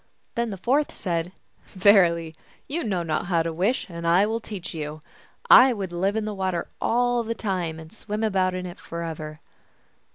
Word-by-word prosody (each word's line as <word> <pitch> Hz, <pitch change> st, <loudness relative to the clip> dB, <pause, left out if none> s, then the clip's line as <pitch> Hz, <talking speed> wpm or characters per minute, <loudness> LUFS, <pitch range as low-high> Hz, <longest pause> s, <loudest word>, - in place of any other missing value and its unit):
Then 235 Hz, 0 st, -1 dB
the 195 Hz, -, -5 dB
fourth 270 Hz, +10 st, +1 dB
said, 170 Hz, -1 st, -3 dB, 0.2 s
" -, -, -35 dB
Verily, 175 Hz, -5 st, +4 dB, 0.3 s
you 330 Hz, +5 st, -2 dB
know 185 Hz, -5 st, -1 dB
not 160 Hz, +1 st, -2 dB
how 170 Hz, -3 st, +2 dB
to 165 Hz, 0 st, -3 dB
wish, 195 Hz, +11 st, 0 dB
and 170 Hz, -2 st, -5 dB
I 175 Hz, +4 st, +5 dB
will 225 Hz, +2 st, -1 dB
teach 200 Hz, -6 st, -7 dB
you. 155 Hz, -1 st, -6 dB, 0.4 s
I 255 Hz, 0 st, +8 dB
would 195 Hz, -5 st, -4 dB
live 190 Hz, +4 st, 0 dB
in 220 Hz, -1 st, -1 dB
the 215 Hz, -, -3 dB
water 190 Hz, -3 st, -2 dB
all 245 Hz, 0 st, +2 dB
the 230 Hz, 0 st, -3 dB
time, 180 Hz, -7 st, -2 dB
and 160 Hz, +4 st, -12 dB
swim 215 Hz, 0 st, -4 dB
about 190 Hz, -4 st, +1 dB
in 185 Hz, 0 st, -4 dB
it 175 Hz, -1 st, -8 dB
forever." 160 Hz, -2 st, -6 dB
185 Hz, 190 wpm, -25 LUFS, 170-220 Hz, 0.4 s, I